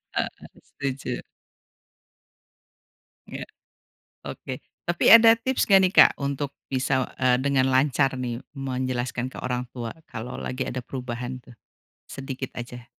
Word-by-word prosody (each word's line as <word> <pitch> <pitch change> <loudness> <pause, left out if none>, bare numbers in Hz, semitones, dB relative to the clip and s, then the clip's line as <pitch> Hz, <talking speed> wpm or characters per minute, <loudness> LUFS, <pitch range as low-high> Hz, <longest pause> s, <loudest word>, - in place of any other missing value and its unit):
Heeh, - - +1 0.4
setuju. 135 -1 -4 2.1
Iya, - - -7 0.8
oke - - -7 0.2
tapi 175 - +4
ada 230 0 +9
tips 260 +3 -1
gak 195 -2 +7
nih, 185 - +3
Kak, - - +8
untuk 140 0 -3 0.2
bisa, 130 0 0
eee, 130 -1 +4
dengan 135 -2 +2
lancar 135 +1 +2
nih 120 -2 -3 0.2
menjelaskan 130 -2 -2
ke 130 - -11
orang 125 0 -2
tua 120 -2 -4 0.2
kalau 115 +2 -6
lagi 130 +1 -3
ada 130 - -4
perubahan 125 0 -6
tuh? - - -15 0.5
Sedikit 135 -1 -6
aja. 120 0 -8
130 Hz, 125 wpm, -25 LUFS, 125-140 Hz, 2.1 s, ada